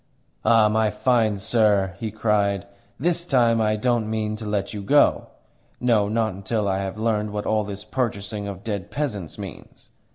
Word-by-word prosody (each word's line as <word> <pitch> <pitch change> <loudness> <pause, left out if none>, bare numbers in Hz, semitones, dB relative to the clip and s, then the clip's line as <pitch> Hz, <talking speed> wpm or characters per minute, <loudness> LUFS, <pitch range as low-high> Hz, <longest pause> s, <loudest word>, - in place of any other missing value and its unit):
"Ah, 115 -2 +5
my 110 0 +2
fine 110 -1 +1
sir!" 100 -2 +2
he 110 - -3
cried. 100 -2 0 0.3
"THIS 170 +4 +1
time 120 -7 +3
I 110 0 +2
don't 115 0 0
mean 110 -1 -1
to 110 -1 -6
let 100 -1 -2
you 105 - -5
go. 145 +9 +3 0.5
No, 115 -5 +3
not 110 -1 0
until 100 +2 -2
I 95 0 0
have 95 +1 -4
learnt 105 -1 0
what 105 0 -4
all 110 -1 +1
this 100 -1 -7
purchasing 105 -3 -3
of 100 -2 -7
dead 100 -5 -4
peasants 110 - -4
means. - - -10
105 Hz, 170 wpm, -23 LUFS, 100-115 Hz, 0.5 s, Ah